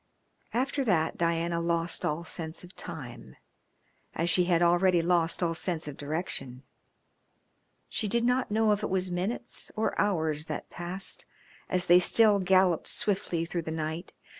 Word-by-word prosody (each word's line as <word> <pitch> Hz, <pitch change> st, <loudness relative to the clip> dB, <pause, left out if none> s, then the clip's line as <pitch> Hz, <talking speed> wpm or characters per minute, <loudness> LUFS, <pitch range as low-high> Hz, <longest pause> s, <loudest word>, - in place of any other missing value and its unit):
After 270 Hz, +3 st, 0 dB
that 165 Hz, -7 st, +1 dB
Diana 170 Hz, 0 st, 0 dB
lost 170 Hz, 0 st, 0 dB
all 155 Hz, +3 st, -1 dB
sense 160 Hz, 0 st, -6 dB
of 180 Hz, -, -14 dB
time, 125 Hz, -, -8 dB, 0.8 s
as 170 Hz, +1 st, 0 dB
she 180 Hz, +2 st, +3 dB
had 175 Hz, -1 st, +3 dB
already 175 Hz, +1 st, +4 dB
lost 170 Hz, 0 st, +1 dB
all 165 Hz, -1 st, +1 dB
sense 165 Hz, -1 st, -2 dB
of 145 Hz, -, -6 dB
direction. 145 Hz, -4 st, -4 dB, 1.2 s
She 215 Hz, -, -2 dB
did 235 Hz, +3 st, +1 dB
not 250 Hz, +1 st, +1 dB
know 215 Hz, +1 st, +2 dB
if 205 Hz, 0 st, +1 dB
it 210 Hz, -, -2 dB
was 185 Hz, -1 st, 0 dB
minutes 195 Hz, +7 st, -3 dB
or 220 Hz, +1 st, 0 dB
hours 160 Hz, -7 st, 0 dB
that -, -, -6 dB
passed 180 Hz, +3 st, -4 dB, 0.4 s
as 180 Hz, -1 st, +2 dB
they 175 Hz, 0 st, +7 dB
still 210 Hz, +2 st, +5 dB
galloped 185 Hz, -2 st, +3 dB
swiftly 180 Hz, -5 st, -1 dB
through 170 Hz, 0 st, -3 dB
the 160 Hz, -, -7 dB
night. 160 Hz, +2 st, -4 dB
175 Hz, 155 wpm, -29 LUFS, 165-190 Hz, 1.2 s, they